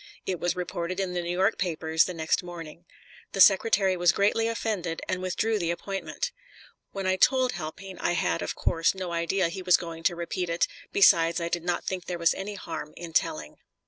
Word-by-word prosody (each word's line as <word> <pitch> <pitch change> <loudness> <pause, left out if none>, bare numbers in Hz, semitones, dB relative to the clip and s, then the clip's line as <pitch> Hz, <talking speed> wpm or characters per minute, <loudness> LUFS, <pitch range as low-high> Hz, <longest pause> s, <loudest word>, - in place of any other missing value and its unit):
It 185 -3 -2
was 175 - 0
reported 180 0 -3
in 190 -2 -1
the 175 - -1
New 170 - -5
York 190 +1 +2
papers 160 -3 +1
the 180 - -4
next 160 -1 0
morning. 170 -1 -9 0.5
The - - -4
Secretary 195 0 +5
was 175 -1 +4
greatly 210 +3 +2
offended 210 -7 -2
and 185 0 -2
withdrew 210 +4 0
the 170 -3 -1
appointment. 195 - -3 0.6
When 195 -1 -4
I 185 0 +2
told 255 +3 +4
Halpine 185 +3 -7
I - - 0
had, 175 -1 0
of - - -3
course, 165 +2 +1
no 185 -2 -4
idea 170 +2 0
he 190 +2 -6
was 180 -1 +5
going 165 -1 -7
to 175 - +3
repeat 170 +1 -3
it; 170 0 +2 0.3
besides, 170 -3 +5
I 170 0 -2
did 175 -1 -2
not 175 0 -1
think 185 -2 -3
there 180 - -3
was 170 -1 +3
any 205 +2 -5
harm 155 -5 -7
in 170 -1 -8
telling. 310 - -1
180 Hz, 205 wpm, -27 LUFS, 170-195 Hz, 0.6 s, Secretary